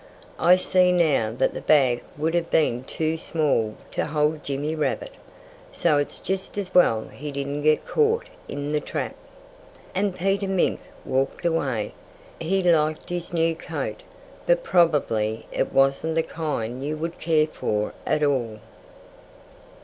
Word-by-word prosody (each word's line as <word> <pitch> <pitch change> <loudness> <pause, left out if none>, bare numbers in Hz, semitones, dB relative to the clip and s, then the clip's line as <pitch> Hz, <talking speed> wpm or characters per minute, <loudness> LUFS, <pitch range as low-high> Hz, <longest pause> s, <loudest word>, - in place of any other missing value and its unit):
"I 180 - +6
see 185 0 +3
now 155 -11 +2
that - - +2
the - - -5
bag 130 -5 +4 0.2
would 160 +2 0
have 170 -1 0
been 150 -7 +3
much 130 - -12
too 160 0 -1
small 140 -11 0 0.2
to - - -1
hold 150 0 0
Jimmy 145 +3 -2
Rabbit. 160 - -2 0.6
So 160 - +2
it's 145 - -3
just 190 +1 -3
as 190 -2 -3
well 115 -11 +4
he 145 +1 -7
didn't 140 +1 -3
get 155 +1 +3
caught 455 +2 +2 0.2
in 145 +1 -4
the 150 - +2
trap." - - -4 0.8
And 195 -1 0
Peter 195 +2 0
Mink 190 -2 +1 0.3
walked 135 +4 -1
away. 135 -10 0 0.5
He 190 +4 0
liked 155 -3 +2
his 175 -1 -4
new 165 -1 +1
coat 335 - -5 0.5
But - - +3
probably 125 - +2
it - - -1
wasn't 135 +4 +2
the 165 - +2
kind 135 -7 -3
you 150 +2 -2
would 165 +2 -4
care 155 -2 +3
for 105 -8 -2
at 150 - +1
all. 120 -7 0
155 Hz, 150 wpm, -24 LUFS, 140-175 Hz, 0.8 s, I